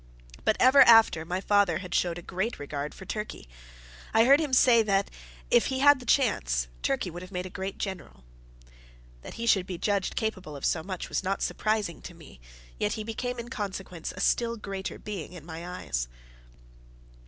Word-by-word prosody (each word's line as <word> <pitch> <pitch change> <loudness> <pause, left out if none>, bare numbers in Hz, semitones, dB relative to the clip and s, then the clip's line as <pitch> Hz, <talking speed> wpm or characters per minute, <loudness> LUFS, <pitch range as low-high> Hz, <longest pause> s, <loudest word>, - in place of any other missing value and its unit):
But - - +3
ever 260 +2 +7
after 225 -8 +6
my 180 +2 -2
father 200 -5 +2
showed 175 -1 0
a 175 - -9
great 190 +7 -3
regard 145 0 -5
for 190 - -11
Turkey. 210 - -6 0.7
I 225 +1 +6
heard 275 +3 +7
him 305 -4 -2
say 250 -2 +6
once 225 -1 +3
that, 195 0 +1 0.4
if 240 -1 +4
he 265 - -2
had 275 +2 +2
had 285 -2 +6
the 250 - -12
chance, - - +2
Turkey 135 - -1
would 175 +2 -8
have 185 +1 -11
made 180 -1 -4
a 185 - -8
great 190 +1 -5
general. 190 - -6 1.0
That - - -10
he 230 - -4
should 190 -5 +3
be 180 - -5
judged 200 +1 -1
capable 190 -9 -3
of 140 - -5
so 160 - +1
much, 185 +1 -6
was - - -2
not 195 +1 -1
surprising 215 -5 -1
to 175 - -10
me; 155 - -15 0.4
yet 105 - 0
he 215 - -4
became 245 +3 -4
in 235 0 -7
consequence 190 -7 -5
a - - -7
still 235 -1 +1
greater 195 -2 -5
being 190 -5 -7
in 170 -4 -11
my 165 +1 -7
eyes. - - -3
195 Hz, 195 wpm, -28 LUFS, 170-225 Hz, 1.0 s, ever